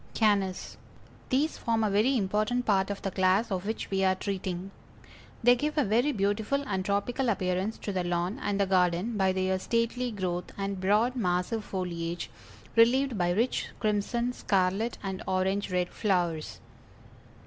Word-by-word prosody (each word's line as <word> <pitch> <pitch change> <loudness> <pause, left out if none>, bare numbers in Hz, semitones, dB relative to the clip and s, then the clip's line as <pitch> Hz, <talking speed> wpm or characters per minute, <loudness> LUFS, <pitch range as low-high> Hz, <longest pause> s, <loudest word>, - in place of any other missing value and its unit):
_ - - -26
CANNAS. 200 -4 +1 0.5
These 285 +5 +1
form 225 -1 0
a 215 - +2
very 225 +7 +3
important 215 +4 0
part 195 -2 +2
of 200 - -5
the 195 - -2
class 190 +4 +2
of 190 +1 -2
which 220 -1 -4
we 195 0 +1
are 190 0 +3
treating. 190 -1 -4 0.7
They 245 +1 +7
give 300 +5 -2
a 295 - +4
very 240 +7 +2
beautiful 215 +5 0
and 190 -4 -2
tropical 205 +6 0
appearance 190 +1 -1
to 205 - -2
the 185 -1 0
lawn 175 +6 -1
and 205 0 -1
the 200 - +3
garden 185 +3 +1
by 190 -2 +2
their 185 0 0
stately 230 +4 0
growth 180 -5 -3
and 195 -1 -3
broad 215 +6 +2
massive 185 +1 0
foliage, 175 -3 -4 0.4
relieved 250 +3 +4
by 175 -3 +1
rich 225 +8 0
crimson, 235 +3 0
scarlet 195 +2 0
and 190 -1 -4
orange 190 +1 0
red 180 -1 0
flowers. 175 -6 -1
200 Hz, 160 wpm, -28 LUFS, 185-230 Hz, 0.7 s, They